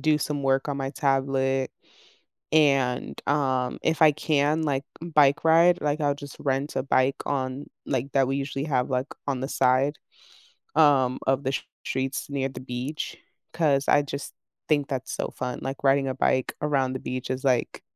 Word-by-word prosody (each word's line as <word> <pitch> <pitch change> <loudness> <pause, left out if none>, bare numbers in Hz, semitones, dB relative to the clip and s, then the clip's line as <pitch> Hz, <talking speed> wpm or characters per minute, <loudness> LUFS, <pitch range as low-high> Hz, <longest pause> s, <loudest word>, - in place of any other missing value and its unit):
do 155 +1 +3
some 145 0 -2
work 135 +1 +1
on 140 - -2
my 135 -1 -3
tablet, 135 -1 0 0.8
and, 140 -5 +2
um, 130 -3 0
if 160 0 0
I 155 - +8
can, 150 +1 +1
like, 140 -3 0 0.2
bike 150 -4 +3
ride, 170 +2 +5
like, 150 +1 0
I'll 145 -1 +2
just 145 -1 -10
rent 135 +1 -1
a - - 0
bike 135 0 +2
on, 135 0 -2 0.2
like 135 0 -2
that 135 -2 +3
we 135 - -1
usually 140 0 -3
have, 130 -4 0
like, 130 +1 0 0.2
on 135 -2 -1
the 135 - -3
side, 135 +2 +2 0.8
um, 140 -5 +4
of 135 +1 +2
the 130 - 0
s 135 - -1 0.2
streets 135 0 -2
near 135 -1 -1
the 130 - -9
beach, 130 +4 -5 0.4
'cause 145 -4 +2
I 145 - +5
just 140 0 -6 0.3
think 145 -3 +2
that's 130 -2 -4
so - - -2
fun, 125 -1 -4
like, 135 +1 -5
riding 135 0 +3
a 130 - -2
bike 130 -1 +1
around 135 -3 +1
the 130 - -4
beach 130 0 -5
is, 130 0 -3
like, 125 -3 +2
th - - -12
135 Hz, 185 wpm, -26 LUFS, 130-145 Hz, 0.8 s, I